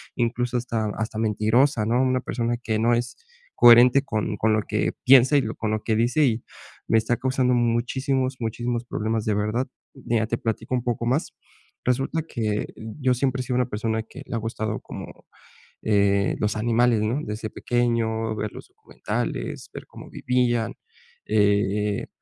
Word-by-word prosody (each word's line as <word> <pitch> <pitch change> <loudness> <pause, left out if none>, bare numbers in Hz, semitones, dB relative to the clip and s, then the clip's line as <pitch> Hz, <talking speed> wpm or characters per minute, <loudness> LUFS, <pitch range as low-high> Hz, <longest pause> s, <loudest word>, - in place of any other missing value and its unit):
incluso 120 +1 0
hasta 115 -2 -2
hasta 110 0 -3
mentirosa, 110 +3 +2
¿no?, 120 +3 +2
una 130 -1 +1
persona 120 -1 -2
que 110 -2 -2
no 120 +1 +3
es 120 +1 -3 0.4
coherente 120 +3 +7
con 110 -5 -2
con 110 +1 +2
lo 110 - +2
que - - 0
piensa, 130 +2 +6
y 135 - +2
con 110 - -3
lo 110 0 -2
que 110 - 0
dice, 120 +7 +2
y 115 -2 0 0.4
me 115 - +3
está 120 +2 +1
causando 130 0 +1
muchísimos, 130 +2 0
muchísimos 120 +1 -2
problemas 110 -1 -2
de 110 - +1
verdad. 105 +5 -1 0.3
Mira, 115 -4 -1
te 115 - -1
platico 115 +2 -3
un 125 - -1
poco 120 -1 -2
más. 130 +7 0 0.5
Resulta 135 +6 0
que 110 -8 -2
yo 125 +4 -1
siempre 130 +1 0
he - - -3
sido 125 0 -2
una 125 0 +1
persona 110 +1 -2
que 110 - -12
le - - -5
ha - - +1
gustado 110 -1 -3
como, - - -10 0.6
eh, 100 -2 +2
los 105 0 0
animales, 120 0 +2
no 110 +6 0
desde 110 -1 -5
pequeño 115 -2 -1
ver 105 -1 -3
los - - -10
documentales, - - -5
ver - - -8
cómo - - -12
vivían, 120 -3 0 0.5
eh, 105 -1 +1
115 Hz, 165 wpm, -24 LUFS, 110-125 Hz, 0.6 s, coherente